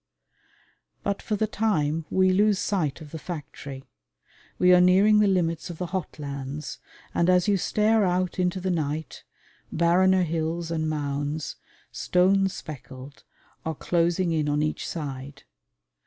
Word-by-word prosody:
But 200 Hz, -1 st, -1 dB
for 215 Hz, -, -2 dB
the 220 Hz, -, +1 dB
time 165 Hz, -8 st, 0 dB
we 185 Hz, 0 st, +3 dB
lose 205 Hz, +2 st, +3 dB
sight 170 Hz, -7 st, -1 dB
of 150 Hz, -2 st, -11 dB
the 160 Hz, -, -6 dB
factory. 140 Hz, -5 st, -7 dB, 0.7 s
We 180 Hz, 0 st, +5 dB
are 180 Hz, -, +7 dB
nearing 195 Hz, +4 st, +5 dB
the 210 Hz, -, +4 dB
limits 175 Hz, -3 st, 0 dB
of 170 Hz, -, -7 dB
the 180 Hz, -, -3 dB
hot 185 Hz, -2 st, -4 dB
lands, 140 Hz, 0 st, -6 dB, 0.3 s
and 170 Hz, +1 st, +2 dB
as 180 Hz, +1 st, +4 dB
you 205 Hz, -, +4 dB
stare 215 Hz, +3 st, +2 dB
out 180 Hz, 0 st, 0 dB
into 180 Hz, +1 st, +1 dB
the 185 Hz, 0 st, -1 dB
night, 155 Hz, -2 st, -3 dB, 0.5 s
barrener 185 Hz, +2 st, +3 dB
hills 165 Hz, 0 st, -2 dB
and 160 Hz, -1 st, -1 dB
mounds, 145 Hz, 0 st, -3 dB, 0.3 s
stone 195 Hz, +2 st, +2 dB
speckled, 140 Hz, -5 st, -10 dB, 0.4 s
are 160 Hz, 0 st, -3 dB
closing 170 Hz, +2 st, +1 dB
in 155 Hz, -2 st, 0 dB
on 150 Hz, +1 st, +1 dB
each 155 Hz, -, -2 dB
side. 140 Hz, -3 st, -6 dB
170 Hz, 145 wpm, -26 LUFS, 150-185 Hz, 0.7 s, are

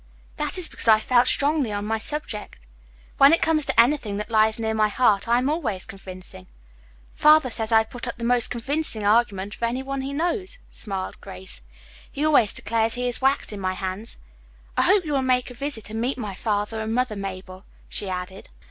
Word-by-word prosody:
"That -, -, -1 dB
is 360 Hz, -3 st, -2 dB
because -, -, -2 dB
I 220 Hz, -1 st, +7 dB
felt 245 Hz, +2 st, +3 dB
strongly 285 Hz, -4 st, +2 dB
on 205 Hz, 0 st, -3 dB
my 220 Hz, +1 st, -1 dB
subject. 220 Hz, -, -5 dB, 0.5 s
When 275 Hz, +1 st, +8 dB
it 330 Hz, -, +3 dB
comes 310 Hz, -2 st, +2 dB
to -, -, 0 dB
anything 235 Hz, -5 st, +3 dB
that 210 Hz, +2 st, -5 dB
lies 220 Hz, 0 st, +3 dB
near 220 Hz, -1 st, -1 dB
my 215 Hz, -1 st, +3 dB
heart 210 Hz, -2 st, +2 dB
I 235 Hz, +1 st, +4 dB
am 250 Hz, +2 st, +1 dB
always 260 Hz, -, -2 dB
convincing. 185 Hz, -, -10 dB, 0.7 s
Father 300 Hz, -4 st, +5 dB
says 225 Hz, 0 st, -3 dB
I 220 Hz, 0 st, +6 dB
put 235 Hz, +2 st, -8 dB
up 240 Hz, -, -5 dB
the 235 Hz, -, -7 dB
most 245 Hz, 0 st, +3 dB
convincing 245 Hz, -2 st, -2 dB
argument 205 Hz, -2 st, +2 dB
of -, -, -13 dB
any 240 Hz, +3 st, -1 dB
one 275 Hz, 0 st, -3 dB
he 270 Hz, +1 st, -4 dB
knows," 350 Hz, +9 st, -2 dB
smiled 195 Hz, -3 st, -5 dB
Grace. 95 Hz, -7 st, -10 dB, 0.5 s
"He 290 Hz, +2 st, -2 dB
always 280 Hz, -9 st, +4 dB
declares 225 Hz, +1 st, -1 dB
he 250 Hz, 0 st, -2 dB
is 245 Hz, -, -1 dB
wax 270 Hz, -2 st, +1 dB
in 205 Hz, -, -6 dB
my 185 Hz, -1 st, -1 dB
hands. 190 Hz, +3 st, -5 dB, 0.6 s
I -, -, +3 dB
hope 385 Hz, -1 st, +4 dB
you 300 Hz, -, -2 dB
will 275 Hz, -, +2 dB
make 255 Hz, -1 st, +1 dB
me -, -, -8 dB
a 240 Hz, -, -18 dB
visit 275 Hz, -7 st, -1 dB
and 220 Hz, +1 st, -3 dB
meet 255 Hz, +3 st, -1 dB
my 210 Hz, -5 st, -5 dB
father 210 Hz, +2 st, -2 dB
and 220 Hz, +1 st, -2 dB
mother, 250 Hz, -3 st, 0 dB
Mabel," 190 Hz, -1 st, -7 dB, 0.2 s
she 200 Hz, -, -4 dB
added. 185 Hz, +1 st, -6 dB
230 Hz, 210 wpm, -24 LUFS, 205-265 Hz, 0.7 s, When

